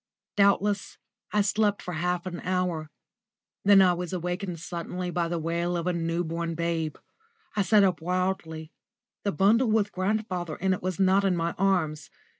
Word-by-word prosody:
Doubtless 200 0 +2 0.3
I 210 - +3
slept 205 0 +1
for 180 - -6
half 175 +2 -1
an 175 -2 -5
hour. 180 -4 -1 0.7
Then 195 -1 +7
I 180 -1 +4
was 175 0 -4
awakened 180 0 -3
suddenly 175 +2 -4
by 175 -1 0
the 170 0 -2
wail 170 +2 -1
of 170 - -3
a 180 - +1
new 170 0 -1
born 165 0 -3
babe. 165 -2 -1 0.6
I 210 - +2
sat 200 +2 +5
up 185 -4 +1
wildly. 175 -3 -2 0.5
The 200 - 0
bundle 220 - +3
with 215 -1 +2
grandfather 185 -4 -2
in 190 +1 +1
it 185 - -4
was 185 0 -3
not 190 +1 +4
in 190 -2 +2
my 170 0 0
arms. 180 -6 0
180 Hz, 170 wpm, -27 LUFS, 170-195 Hz, 0.7 s, Then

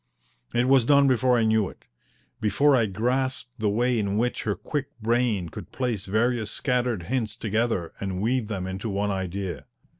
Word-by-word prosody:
It 120 +1 +3
was 135 -2 +5
done 140 +2 +5
before 130 -1 +3
I 115 - +2
knew 110 -2 +2
it - - -17 0.5
before 135 +8 +3
I 115 -4 +3
grasped 125 +4 -2
the 110 -1 +1
way 120 +3 +1
in 100 -1 -1
which 120 +2 0
her 105 -2 0
quick 140 - -3
brain 115 -5 +1
could - - -9
place 120 -7 -2
various 110 +2 +1
scattered 125 -8 -1
hints 110 0 -2
together 110 -6 -1
and 95 -2 -3
weave 115 +2 0
them 95 -4 -3
into 95 +4 -4
one 100 +1 0
idea. 95 -1 -4
110 Hz, 175 wpm, -26 LUFS, 100-125 Hz, 0.5 s, was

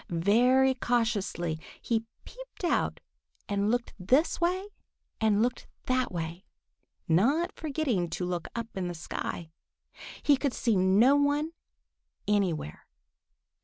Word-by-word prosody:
Very 245 +10 +4
cautiously 215 -10 -1 0.2
he 225 -1 -1 0.2
peeped - - -12
out 345 - +1 0.5
and 200 0 0
looked 240 +1 -1
this 260 - +2
way 370 +4 0 0.5
and 220 -1 +3
looked 250 +1 -2 0.2
that 255 0 +1
way, 170 +1 -5 0.6
not 265 - +3
forgetting 275 - -1
to 180 +2 -3
look 175 -2 -3
up 230 -1 -5
in 185 -2 -2
the 175 - -4
sky. 160 0 -5 0.7
He 290 -2 +5
could 275 -2 -1
see 230 -3 +1
no 195 +9 +5
one 290 +2 +1 0.8
anywhere. 185 - -1
230 Hz, 120 wpm, -29 LUFS, 180-270 Hz, 0.8 s, He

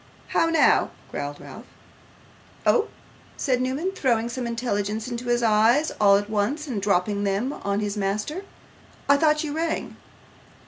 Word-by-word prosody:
'How 330 - +2
now?' 330 -1 +4 0.2
growled 145 0 -5
Ralph. - - -11 1.0
'Oh!' 460 - +3 0.5
said 255 -2 0
Newman, 275 +9 -1
throwing 240 -10 0
some 245 0 -4
intelligence 220 -2 -2
into 240 0 -5
his 240 0 +1
eyes 230 +7 +3
all 200 -1 +6
at 205 0 -3
once, 220 +9 -1
and 240 -9 -3
dropping 200 +1 +1
them 205 +8 0
on 200 -4 -2
his 205 0 -2
master, 210 - -2 0.7
'I 280 - +6
thought 305 0 +2
you 295 -2 -3
rang. 330 +1 -2
235 Hz, 145 wpm, -24 LUFS, 205-280 Hz, 1.0 s, all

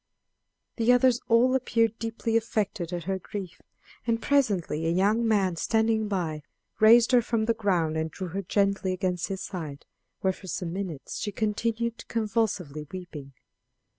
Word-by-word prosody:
The 230 +1 +4
others 245 -1 +4
all 240 +3 +4
appeared 230 -3 +1
deeply 225 0 -2
affected 205 -6 -1
at 175 -1 -3
her 190 +2 -2
grief, 190 -1 -7 0.5
and 230 -1 +2
presently 200 - +1
a - - +2
young 210 +6 +2
man 195 -5 +2
standing 220 +2 +1
by 170 -6 -2 0.4
raised 230 +3 +7
her 250 -1 +6
from 225 -1 0
the 230 - +2
ground 180 -8 0
and 160 0 -1
drew 185 +2 -6
her 195 +4 -3
gently 195 0 +1
against 180 -2 -1
his 190 -2 -4
side, 155 -7 -6 0.4
where 190 -1 +2
for 190 - -13
some 175 -2 -3
minutes 180 -7 -5
she 205 - -3
continued 225 +3 -2
convulsively 205 -10 -1
weeping. 155 -7 -8
200 Hz, 155 wpm, -27 LUFS, 180-230 Hz, 0.5 s, raised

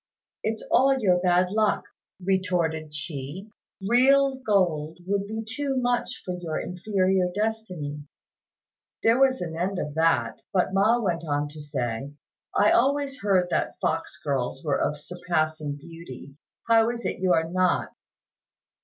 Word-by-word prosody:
"It's 220 0 -2
all 270 +1 +5
your 185 -7 +3
bad 180 0 +2
luck," 215 0 +2 0.4
retorted 175 -5 0
she; 150 +6 -5 0.4
"real 270 +4 +5
gold 175 - +1
would 200 +1 -1
be 220 +1 -4
too 270 +4 -2
much 245 0 -1
for 180 - -3
your 160 -3 -3
inferior 185 0 0
destiny." 185 -10 -3 1.0
There 230 +3 +4
was 265 -1 +3
an 165 -2 -4
end 185 +3 -1
of 150 - -3
that; 165 +1 +1
but 185 0 +1
Ma 210 +5 +4
went 175 -6 -1
on 145 -1 -1
to 150 +1 -10
say, 135 -1 -4 0.4
"I 205 - +5
always 275 +2 +2
heard 185 -3 +2
that - - -1
fox - - -2
girls 135 -1 -2
were 145 - +1
of 150 - -1
surpassing 155 -3 -2
beauty; 145 -3 -11 0.3
how 225 0 +5
is 235 0 -5
it - - -2
you 185 -1 +3
are 160 -1 +2
not?" 185 +2 +1
180 Hz, 145 wpm, -26 LUFS, 155-220 Hz, 1.0 s, all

